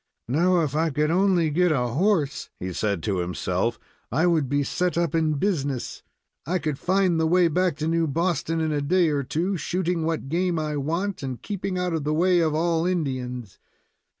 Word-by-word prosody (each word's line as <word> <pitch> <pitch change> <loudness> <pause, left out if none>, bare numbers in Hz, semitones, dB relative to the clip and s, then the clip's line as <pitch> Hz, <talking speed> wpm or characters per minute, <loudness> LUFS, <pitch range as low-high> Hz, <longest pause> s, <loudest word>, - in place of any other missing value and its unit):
"Now, 170 +7 +3
if 150 -3 -2
I 160 +1 +2
could 150 +2 0
only 180 -3 +3
get 180 +3 +3
a 125 -5 +1
horse," 155 - 0
he 90 0 -4
said 100 -3 -1
to 100 -3 -1
himself, 90 +5 -1 0.3
"I 155 +9 +2
would 160 -6 +2
be 145 +1 +1
set 180 +5 -1
up 170 -3 0
in 160 -2 +1
business. 140 - -2 0.4
I 180 +3 0
could 150 -4 -3
find 185 -2 +2
the 160 - +2
way 175 +1 +4
back 180 -1 +1
to 155 0 -2
New 165 0 +1
Boston 165 +1 0
in 160 -1 0
a 145 -1 0
day 175 +3 +2
or 145 -2 0
two, 175 +8 -1
shooting 175 0 -1
what 160 -3 -2
game 175 +3 0
I 155 -1 -2
want, 170 +6 -2
and 130 -3 -4
keeping 195 -2 -4
out 180 -1 -1
of 160 -3 -1
the 150 +1 0
way 180 +2 +3
of 160 -2 +1
all 165 +1 +1
Indians. 130 - -3
160 Hz, 200 wpm, -25 LUFS, 140-180 Hz, 0.4 s, way